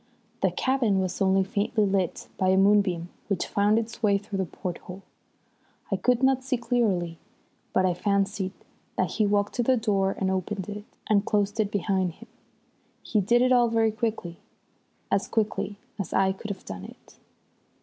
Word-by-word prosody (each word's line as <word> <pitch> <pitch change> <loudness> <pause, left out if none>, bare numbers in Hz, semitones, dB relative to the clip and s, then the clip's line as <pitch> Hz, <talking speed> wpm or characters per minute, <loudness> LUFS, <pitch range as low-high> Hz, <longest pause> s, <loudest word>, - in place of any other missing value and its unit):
The 190 - +4
cabin 230 0 +1
was 185 0 -2
only 190 0 +4
faintly 205 +2 0
lit 195 -3 -1
by 185 - +1
a 190 - +4
moonbeam 195 -4 +3 0.2
which 195 -4 0
found 205 +2 +2
its 225 0 -3
way 205 -3 +4
through 200 -1 -5
the 190 - +1
porthole. 180 +2 -7 0.9
I - - +3
could 245 +6 +1
not 265 -1 +3
see 260 -1 0
clearly, 200 -9 0 0.5
but 185 - +2
I 180 - +2
fancied 200 +1 0 0.5
that - - +1
he 215 -2 +1
walked 205 0 +1
to - - +3
the 255 +2 +3
door 200 -4 +1
and 190 -1 0
opened 190 0 -2
it, 205 0 -6 0.2
and 205 -2 +3
closed 205 +1 0
it 210 -2 +2
behind 190 -3 0
him. 230 - -15 0.8
He 215 - +1
did 240 +5 +3
it 255 - +3
all 240 -2 +5
very 225 -1 +2
quickly, 215 -6 -3 0.7
as 195 - +1
quickly 210 -2 -1 0.2
as 195 - -4
I 190 0 +3
could 195 +3 -7
have 200 -2 -6
done 95 -1 -7
it. - - -15
200 Hz, 175 wpm, -26 LUFS, 190-220 Hz, 0.9 s, all